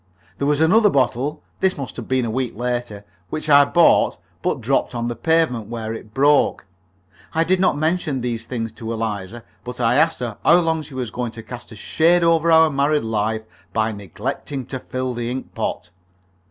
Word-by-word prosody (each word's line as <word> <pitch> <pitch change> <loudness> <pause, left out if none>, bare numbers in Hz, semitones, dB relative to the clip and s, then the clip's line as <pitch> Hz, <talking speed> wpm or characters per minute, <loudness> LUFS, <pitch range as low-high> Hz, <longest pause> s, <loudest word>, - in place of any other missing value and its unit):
There 140 - 0
was 150 +1 +2
another 210 +7 +5
bottle 140 +1 0 0.2
(this 190 -1 +1
must 135 -3 -6
have 120 - -7
been 130 -2 +1
a 115 - -2
week 125 -1 -2
later) 120 -4 -3 0.2
which 155 - -4
I 140 0 +8
bought, 170 +4 +4 0.2
but - - -1
dropped - - 0
on 120 0 -2
the 120 - -3
pavement, 125 -5 +1
where 115 -1 -4
it 110 -1 -9
broke. 140 +1 +3 0.7
I 165 - +3
did 185 +2 +1
not 185 -6 +2
mention 155 -3 0
these 115 -2 -3
things 115 -3 -3
to 110 +1 -7
Eliza, 110 -1 -4 0.2
but 125 0 -7
I 120 +1 +2
asked 160 +2 +3
her 120 -4 -4
how 170 - +6
much 175 -1 +3
longer 160 -1 0
she 140 -2 -12
was 125 -4 -3
going 120 -2 -4
to 115 - -9
cast 120 +2 -9
a - - -9
shade 170 +10 +2
over 165 0 +3
our 160 -1 +6
married 145 +2 +1
life 110 0 -1 0.3
by 110 0 +1
neglecting 120 - -5
to 130 - -2
fill 130 0 -4
the 120 0 -3
ink 130 +1 -5
pot. - - -4
125 Hz, 200 wpm, -21 LUFS, 115-155 Hz, 0.7 s, I